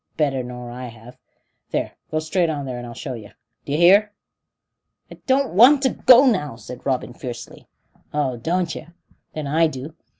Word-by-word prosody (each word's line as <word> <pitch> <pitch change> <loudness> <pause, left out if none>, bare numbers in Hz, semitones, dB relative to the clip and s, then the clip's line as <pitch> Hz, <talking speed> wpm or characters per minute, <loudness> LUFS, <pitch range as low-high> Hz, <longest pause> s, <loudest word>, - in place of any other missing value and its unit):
Better 140 -4 +1
nor 125 -1 -8
I 125 +1 -7
have. 120 +2 -14 0.5
There, - - -2 0.2
go 155 - -2
straight 165 +2 0
on 145 -3 -3
there, 125 -2 -5
and 120 - -7
I'll 120 - -9
show 135 -1 -5
yer. 110 -4 -10 0.3
D'yer 145 +1 -1
hear?" 200 +5 +5 1.0
"I - - -12
don't 270 0 +2
want 260 +8 +7
to 265 - +4
go 255 +1 +6
now," 165 - +1
said 120 +3 -10
Robin 125 -3 -1
fiercely. 120 -1 -9 0.4
"Oh, 145 -4 -1
don't 170 +7 -1
yer? 165 +2 -10 0.4
Then 155 -1 -4
I 160 +4 +3
do. 145 +1 -7
145 Hz, 175 wpm, -22 LUFS, 125-175 Hz, 1.0 s, want